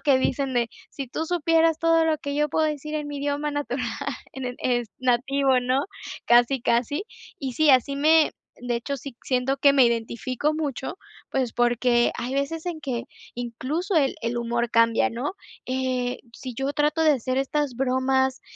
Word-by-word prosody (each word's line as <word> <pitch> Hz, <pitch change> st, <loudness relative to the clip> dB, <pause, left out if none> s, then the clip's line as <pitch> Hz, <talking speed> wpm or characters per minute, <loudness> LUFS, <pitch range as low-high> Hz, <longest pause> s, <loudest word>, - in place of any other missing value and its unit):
que 275 Hz, -3 st, +4 dB
dicen 265 Hz, +1 st, 0 dB
de: 235 Hz, -1 st, +1 dB, 0.2 s
"Si 275 Hz, -2 st, -6 dB
tú 320 Hz, +6 st, -4 dB
supieras 330 Hz, -1 st, +2 dB
todo 330 Hz, 0 st, +3 dB
lo 315 Hz, -, +2 dB
que 285 Hz, 0 st, -4 dB
yo 300 Hz, +1 st, +1 dB
puedo 315 Hz, +3 st, +1 dB
decir 300 Hz, 0 st, -4 dB
en 300 Hz, -1 st, -3 dB
mi 290 Hz, -1 st, -5 dB
idioma 290 Hz, +1 st, -1 dB
natural 275 Hz, -4 st, -2 dB, 0.5 s
en 265 Hz, -1 st, -5 dB
el 250 Hz, 0 st, -5 dB
es 240 Hz, -2 st, 0 dB
nativo", 260 Hz, +1 st, +2 dB
¿no?, 255 Hz, +3 st, +1 dB, 0.4 s
casi, 240 Hz, +2 st, +4 dB
casi 255 Hz, -, +1 dB, 0.3 s
y 265 Hz, -3 st, -4 dB
sí, 310 Hz, +4 st, +4 dB
así 260 Hz, +1 st, +4 dB
me 310 Hz, +2 st, +4 dB, 0.3 s
de 245 Hz, -1 st, -1 dB
hecho, 275 Hz, +4 st, -4 dB
sí 265 Hz, -1 st, -9 dB
siento 260 Hz, +1 st, 0 dB
que 280 Hz, +1 st, +5 dB
me 265 Hz, -3 st, +6 dB
identifico 235 Hz, +5 st, -1 dB
mucho, 305 Hz, -, -4 dB, 0.3 s
pues 255 Hz, -4 st, -1 dB
porque 240 Hz, 0 st, +3 dB
hay 255 Hz, +2 st, -3 dB
veces 300 Hz, +4 st, -2 dB
en 335 Hz, -3 st, -3 dB
que 250 Hz, -4 st, -3 dB, 0.3 s
incluso 260 Hz, -, -3 dB
el 275 Hz, -4 st, +2 dB
el 235 Hz, +1 st, -2 dB
humor 235 Hz, 0 st, -1 dB
cambia, 230 Hz, -1 st, +4 dB
¿no?, 245 Hz, +8 st, -3 dB, 0.3 s
eh, 255 Hz, -1 st, -1 dB, 0.2 s
si 255 Hz, +1 st, -7 dB
yo 270 Hz, +3 st, -1 dB
trato 300 Hz, +2 st, +1 dB
de 310 Hz, -1 st, +6 dB
hacer 255 Hz, 0 st, -1 dB
estas 275 Hz, -1 st, -1 dB
bromas 265 Hz, +1 st, +1 dB
265 Hz, 180 wpm, -25 LUFS, 245-295 Hz, 0.5 s, me